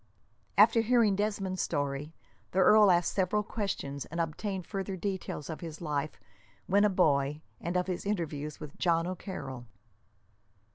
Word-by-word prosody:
After 230 - +7
hearing 225 -3 +3
Desmond's 195 -2 -1
story 145 0 -2 0.4
the - - -3
earl 210 +2 +7
asked 175 -1 +3
several 200 +2 +1
questions, 195 -10 -3
and 165 - -6
obtained 185 +3 -2
further 195 -1 -4
details 190 -5 -4
of 160 - -5
his 165 -2 -7
life 150 -2 -3 0.5
when 200 +2 +3
a 210 - +5
boy, 150 -5 +2 0.2
and 175 +2 -2
of 180 - +1
his 180 -1 -3
interview 160 -7 -2
with 150 -1 -10
John 165 -2 +2
O'Carroll. 140 - -6
180 Hz, 145 wpm, -30 LUFS, 150-200 Hz, 0.5 s, After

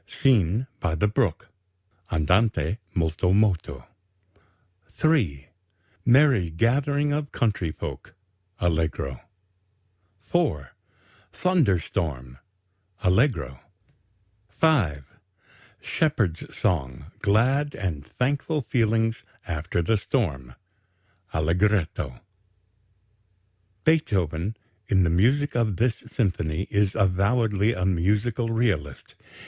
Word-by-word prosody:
SCENE 115 - +2
BY 85 -3 -1
THE 95 +6 +2
BROOK 105 - 0 0.6
(Andante 85 +3 +1 0.2
molto 85 +2 +1
moto) 100 -4 +1 1.1
3. 95 - +1 0.6
MERRY 125 - +4
GATHERING 140 - +1
OF 145 -1 -3
COUNTRY 100 -8 0
FOLK - - -8 0.4
(Allegro) 80 -6 -1 1.0
4. 100 - -1 0.6
THUNDER 170 - +2
STORM 65 -8 -4 0.6
(Allegro) 90 - +1 0.9
5. 100 - +1 0.8
SHEPHERD'S 110 - -1
SONG; 65 -8 -1 0.2
GLAD 130 +8 +2
AND 80 -7 -3
THANKFUL 145 - -1
FEELINGS 115 -1 +1 0.2
AFTER 85 +1 -2
THE 110 +6 +2
STORM 70 - -2 0.8
(Allegretto) 85 - 0 1.6
Beethoven 100 - +1 0.3
in 95 -2 +3
the 85 - +1
music 130 +12 +2
of 115 -5 0
this 115 -1 +1
symphony 90 -6 -1
is 100 -1 +1
avowedly 100 +3 +2
a 90 - -1
musical 105 +6 0
realist. 100 - -1
100 Hz, 85 wpm, -25 LUFS, 80-120 Hz, 1.6 s, MERRY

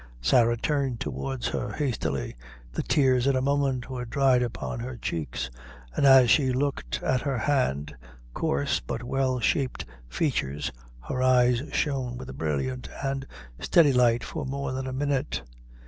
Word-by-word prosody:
Sarah 120 - +3
turned 135 -2 -1
towards 65 -5 -3
her - - -3
hastily; 80 - -2 0.4
the - - -2
tears, 130 -3 +3
in 140 - +3
a - - +2
moment, 140 -2 +1
were 130 -2 -4
dried 130 +1 +3
upon 120 -1 -3
her 120 +1 -5
cheeks, 65 - -3 0.4
and 140 - +4
as 130 -3 +7
she 135 -4 +4
looked 140 +2 -2
at 130 -1 +1
her 140 -3 -1
hard, 95 - 0 0.4
coarse, 70 +1 0
but 115 - -5
well 130 0 0
shaped 135 +2 0 0.2
features, 70 - -1 0.4
her 130 - -2
eyes 125 -1 +4
shone 130 -5 -1
with - - -7
a - - -9
brilliant 80 - -2
and 135 0 -2 0.3
steady 150 -5 +4
light 120 -2 +3
for - - -5
more 140 0 -3
than 130 0 -3
a - - -3
minute. 140 - -1
125 Hz, 155 wpm, -27 LUFS, 115-135 Hz, 0.4 s, as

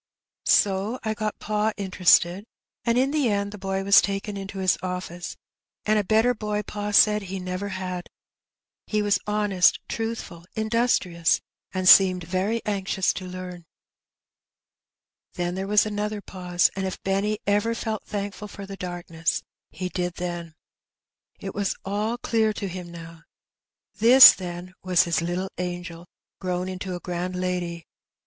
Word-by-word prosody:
So 200 +4 +3
I 220 -1 -1
got 215 0 -3
pa 215 +1 -1
interested, 185 -1 +3 0.4
and 235 0 +1
in 265 +2 +2
the 290 -5 +1
end 200 -1 -1
the 210 - -9
boy 195 0 -2
was 200 0 +7
taken 200 +1 -3
into 195 0 -7
his 190 -1 +2
office, 180 -1 -5 0.5
and 215 0 +3
a - - 0
better 220 +5 +3
boy 210 -2 -3
pa 205 0 -5
said 210 +1 +5
he 195 0 -6
never 185 +2 -4
had. 185 -2 -5 0.8
He 210 -1 0
was 205 -1 +2
honest, 205 -3 +3
truthful, 225 -7 -5
industrious, 220 -7 +1 0.3
and 185 -1 -2
seemed 185 -2 +7
very 190 +7 -1
anxious 195 -2 0
to 185 - -6
learn. 180 -2 -8 1.7
Then 175 0 -2
there 190 +1 -4
was 210 +1 +4
another 210 0 -3
pause, 180 -3 0
and 190 0 -2
if 185 - -5
Benny 200 +2 0
ever 205 +3 +1
felt 220 -2 -3
thankful 205 0 -5
for 200 -1 -9
the 195 0 -8
darkness, 175 -3 -3 0.3
he 185 - -5
did 180 -1 -3
then. 175 -2 -5 0.8
It 195 - -6
was 200 -1 -1
all 210 +4 -1
clear 220 -2 +1
to 205 -1 -4
him 180 -1 -7
now. 165 -1 -10 0.8
This, 250 +4 +10
then, 180 0 -7
was 180 -2 +3
his 170 -2 0
little 180 +3 -3
angel, 175 -1 -5 0.3
grown 180 -1 -2
into 185 0 -5
a - - -5
grand 180 0 -4
lady! 180 -2 -3
195 Hz, 150 wpm, -25 LUFS, 180-210 Hz, 1.7 s, This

